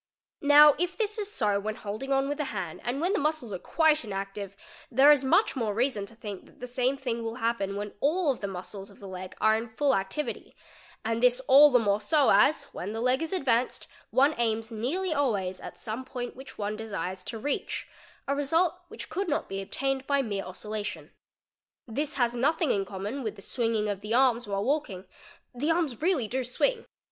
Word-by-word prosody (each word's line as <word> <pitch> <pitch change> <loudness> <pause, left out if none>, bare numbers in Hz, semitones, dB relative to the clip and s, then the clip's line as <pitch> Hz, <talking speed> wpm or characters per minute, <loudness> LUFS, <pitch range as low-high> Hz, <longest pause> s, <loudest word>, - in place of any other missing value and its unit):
Now 295 +1 +8
if 355 +1 -1
this 430 -1 -1
is 415 -1 -2
so 210 - +1
when 215 +1 -3
holding 215 +7 -5
on: 270 0 +2
with 290 +1 -3
the 295 - 0
hand 190 -9 -5
and 245 +4 -2
when 355 +5 +1
the - - +1
muscles 295 -7 -1
are 185 - -4
quite 315 - +2
inactive, 195 -1 -5 0.3
there 270 +5 +7
is 290 -2 +4
much 390 +11 +3
more 220 -5 -1
reason 230 -4 0
to 230 - -13
think 205 -4 -8
that - - -21
the 250 - -5
same 250 +2 0
thing 240 -4 -3
will 225 0 -4
happen 225 -5 -1
when 205 0 -5
all 305 - +2
the: 205 -5 -5
muscles 195 +1 -6
of 200 - -16
the 200 - -10
leg 185 0 -7
are 220 0 +4
in 225 +1 -3
full 275 +5 +1
activity, 195 +10 -4 0.5
and 225 +1 0
this 250 0 +4
all 280 +3 +8
the 255 - +5
more 210 -3 +1
so 300 -4 +3
as 280 +9 +5
when 200 +4 -5
the 225 - -3
leg 255 +4 +2
is 325 - -3
advanced 255 -10 0 0.2
one 280 +4 +4
aims 225 0 0
nearly 310 - -1
always 205 -11 0
at - - -9
some 225 +4 -5
point 245 -2 -6
which 265 +2 -11
one 210 0 -2
desires 190 -4 -5
to 230 - -5
reach, 285 +6 -3 0.4
a 280 - +1
result 325 +4 +2
which 450 - -9
could 390 -1 -2
not 295 - -1
be 195 0 -4
obtained 270 +6 -2
by 280 -1 +2
mere 200 -4 -3
oscillation 210 +2 -6 0.7
This 285 +6 -2
has 240 -3 +1
nothing 305 +4 +2
in 195 -1 0
common 200 +8 -5
with 220 -4 -4
the 195 - -11
swinging 225 -4 0
of 200 -2 -3
the 210 +2 -1
arms 245 -3 +3
while 200 0 -1
wal 295 +3 +2
ie - - -6
ing: 185 +1 -9 0.5
the 275 +6 -2
arms 325 -7 0
really 320 - +1
do 260 +4 -2
swing. 455 - 0
245 Hz, 210 wpm, -28 LUFS, 210-285 Hz, 0.7 s, Now